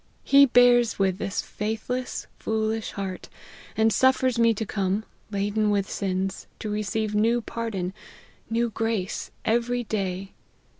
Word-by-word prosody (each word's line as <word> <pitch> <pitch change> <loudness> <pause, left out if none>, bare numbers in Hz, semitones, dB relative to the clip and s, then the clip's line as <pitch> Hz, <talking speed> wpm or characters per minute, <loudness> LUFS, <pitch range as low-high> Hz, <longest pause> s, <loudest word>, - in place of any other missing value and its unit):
He 280 0 +7
bears 245 -1 +5
with 190 -2 +1
this 195 +2 -2
faithless, 225 +4 -3
foolish 220 0 -1
heart, 190 -2 -5 0.5
and 220 0 +4
suffers 260 +1 +3
me 230 0 +5
to 220 - -3
come, 200 +1 -1 0.2
laden 205 +1 0
with 200 -1 +1
sins, 190 0 -2
to 215 - -4
receive 215 +1 -1
new 225 +3 +3
pardon, 220 -6 -4 0.6
new 230 +1 0
grace, 220 -3 -2 0.2
every 240 +2 +1
day. 195 -3 -3
220 Hz, 130 wpm, -25 LUFS, 195-230 Hz, 0.6 s, He